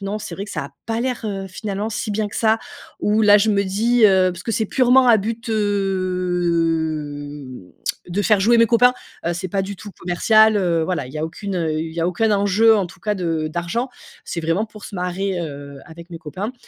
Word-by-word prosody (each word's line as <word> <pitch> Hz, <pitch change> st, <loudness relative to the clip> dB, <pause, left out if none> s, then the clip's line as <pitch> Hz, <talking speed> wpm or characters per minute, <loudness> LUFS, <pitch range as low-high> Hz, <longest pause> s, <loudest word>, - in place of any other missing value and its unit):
non 200 Hz, +2 st, -3 dB
c'est 215 Hz, -, -7 dB
vrai 195 Hz, -, -5 dB
que 210 Hz, -, -10 dB
ça -, -, -3 dB
a -, -, -15 dB, 0.2 s
pas 225 Hz, +1 st, -1 dB
l'air, 250 Hz, 0 st, -2 dB
heu, 195 Hz, -2 st, -3 dB
finalement 205 Hz, +2 st, -4 dB
si 215 Hz, 0 st, -3 dB
bien 210 Hz, 0 st, -1 dB
que -, -, -8 dB
ça». 220 Hz, 0 st, +3 dB, 0.4 s
Ou 210 Hz, +1 st, +2 dB
là 205 Hz, -1 st, +7 dB
je 215 Hz, +2 st, +2 dB
me 200 Hz, -1 st, +2 dB
dis, 225 Hz, +5 st, +2 dB
heu- 190 Hz, -2 st, +4 dB
parce 175 Hz, 0 st, -9 dB
que 225 Hz, -, -2 dB
c'est 220 Hz, 0 st, 0 dB
purement 255 Hz, +2 st, +4 dB
à 230 Hz, -, +7 dB
but, 225 Hz, +3 st, -4 dB
hem, 170 Hz, -, -1 dB, 0.4 s
de 185 Hz, +4 st, -1 dB
faire 210 Hz, +1 st, +4 dB
jouer 235 Hz, +5 st, +4 dB
mes 230 Hz, -, +6 dB
copains, 245 Hz, +2 st, +4 dB, 0.3 s
heu, 170 Hz, -, +1 dB
c'est 185 Hz, +2 st, -4 dB
pas 195 Hz, +2 st, -1 dB
du 200 Hz, +1 st, -5 dB
tout 205 Hz, -, -10 dB
commercial 215 Hz, +5 st, +4 dB
heu, 175 Hz, -4 st, +1 dB
voilà 175 Hz, -6 st, -2 dB
il -, -, -12 dB
y 155 Hz, -, -5 dB
a 155 Hz, -, -1 dB
aucune, 190 Hz, +4 st, -5 dB
heu, 165 Hz, -3 st, -1 dB
il 160 Hz, 0 st, -5 dB
y -, -, -6 dB
a 165 Hz, -, +1 dB
aucun 215 Hz, +5 st, +1 dB
enjeu 205 Hz, +3 st, +4 dB
en 195 Hz, -3 st, 0 dB
tout 175 Hz, -, -16 dB
cas 210 Hz, -1 st, -1 dB
de 165 Hz, -4 st, -1 dB
d'argent, 175 Hz, +10 st, -2 dB, 0.4 s
c'est -, -, -5 dB
vraiment 165 Hz, +6 st, 0 dB
pour 215 Hz, -1 st, -13 dB
se -, -, -9 dB
marrer, 180 Hz, +1 st, -2 dB
heu, 140 Hz, -3 st, -7 dB
avec 170 Hz, +1 st, -12 dB
mes 165 Hz, -, -7 dB
copains- 185 Hz, -, -5 dB
195 Hz, 230 wpm, -21 LUFS, 170-215 Hz, 0.4 s, là